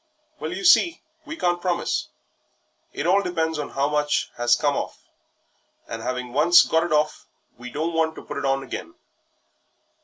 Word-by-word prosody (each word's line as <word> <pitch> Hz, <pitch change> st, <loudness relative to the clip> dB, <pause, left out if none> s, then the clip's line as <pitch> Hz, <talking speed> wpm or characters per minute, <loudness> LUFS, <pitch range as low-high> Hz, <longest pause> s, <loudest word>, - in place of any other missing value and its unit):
"Well, -, -, -4 dB
you 370 Hz, 0 st, -5 dB
see, 345 Hz, -1 st, +5 dB, 0.2 s
we 320 Hz, +2 st, -6 dB
can't 175 Hz, -, 0 dB
promise; 180 Hz, -1 st, -1 dB, 0.8 s
it -, -, -4 dB
all 190 Hz, +3 st, +4 dB
depends 160 Hz, -4 st, -1 dB
on 150 Hz, -, -4 dB
how 140 Hz, +1 st, 0 dB
much 150 Hz, 0 st, 0 dB
has 120 Hz, 0 st, +3 dB
come 145 Hz, +1 st, 0 dB
off, -, -, -4 dB, 0.9 s
and 115 Hz, -, -6 dB
'aving 125 Hz, 0 st, -4 dB
once 175 Hz, +6 st, +6 dB
got 160 Hz, +1 st, +1 dB
it -, -, -4 dB
hoff, 150 Hz, 0 st, 0 dB, 0.3 s
we 125 Hz, 0 st, -8 dB
don't 160 Hz, +6 st, -3 dB
want 160 Hz, -1 st, +1 dB
to -, -, -10 dB
put -, -, -6 dB
it -, -, -3 dB
on 135 Hz, 0 st, +1 dB
again." 330 Hz, -, -7 dB
160 Hz, 175 wpm, -23 LUFS, 135-175 Hz, 0.9 s, once